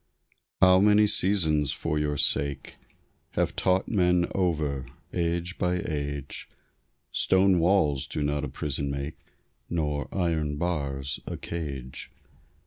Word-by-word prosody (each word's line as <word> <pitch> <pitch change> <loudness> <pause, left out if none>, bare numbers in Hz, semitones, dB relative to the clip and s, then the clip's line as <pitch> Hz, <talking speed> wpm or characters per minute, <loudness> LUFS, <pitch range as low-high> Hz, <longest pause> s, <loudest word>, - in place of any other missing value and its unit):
How 95 0 +7
many 105 +1 +5
seasons 80 -9 +3
for 75 -2 -2
your 75 -1 -1
sake 70 0 +1 0.6
Have - - 0
taught 95 +1 +1
men 90 -4 +2
over, 75 -8 -1 0.3
age 85 +1 -2
by 90 0 +1
age, 70 -3 -4 0.6
"Stone 95 -1 +3
walls 80 -6 +2
do 75 - -3
not 75 0 -1
a 75 - -3
prison 70 0 -3
make, 70 +2 -5 0.5
Nor 75 -4 -1
iron 80 -5 -1
bars 70 -5 -2
a - - -4
cage!" 70 -7 -6
75 Hz, 120 wpm, -27 LUFS, 70-90 Hz, 0.6 s, How